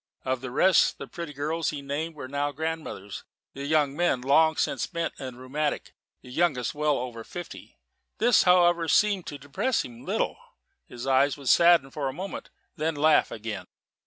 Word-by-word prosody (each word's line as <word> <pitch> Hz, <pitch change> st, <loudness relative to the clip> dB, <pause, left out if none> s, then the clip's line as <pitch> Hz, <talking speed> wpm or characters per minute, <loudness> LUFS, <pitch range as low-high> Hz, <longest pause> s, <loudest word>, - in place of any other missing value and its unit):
Of 130 Hz, -1 st, -1 dB
the 130 Hz, -, -5 dB
rest, 180 Hz, +8 st, +4 dB
the -, -, -7 dB
pretty 170 Hz, -3 st, -7 dB
girls 155 Hz, +3 st, -2 dB
he 145 Hz, -2 st, -5 dB
named 155 Hz, +4 st, -3 dB
were 135 Hz, -3 st, -7 dB
now 145 Hz, +2 st, -1 dB
grandmothers, 155 Hz, -9 st, -5 dB, 0.3 s
the 140 Hz, +1 st, -6 dB
young 145 Hz, -2 st, +2 dB
men 170 Hz, -6 st, +1 dB
long 160 Hz, +4 st, +4 dB
since -, -, 0 dB
bent 170 Hz, -1 st, -3 dB
and 130 Hz, -2 st, -7 dB
rheumatic; 145 Hz, +4 st, -3 dB, 0.3 s
the 125 Hz, -, -12 dB
youngest 140 Hz, -5 st, 0 dB
well 150 Hz, -1 st, +1 dB
over 120 Hz, -2 st, -5 dB
fifty. 175 Hz, +9 st, -9 dB, 0.4 s
This, 240 Hz, 0 st, +5 dB
however, 175 Hz, -2 st, +4 dB
seemed 205 Hz, 0 st, +2 dB
to 145 Hz, -, -6 dB
depress 145 Hz, -, -1 dB
him 120 Hz, -1 st, -11 dB
little. -, -, -1 dB, 0.5 s
His 120 Hz, +1 st, -8 dB
eyes 135 Hz, +2 st, +3 dB
would 140 Hz, -2 st, -4 dB
sadden 170 Hz, -6 st, +5 dB
for 140 Hz, -2 st, -2 dB
a -, -, -6 dB
moment, 190 Hz, +6 st, -6 dB, 0.3 s
then 160 Hz, -1 st, -1 dB
laugh 155 Hz, +1 st, +4 dB
again. 110 Hz, -1 st, -6 dB
145 Hz, 175 wpm, -27 LUFS, 130-165 Hz, 0.5 s, This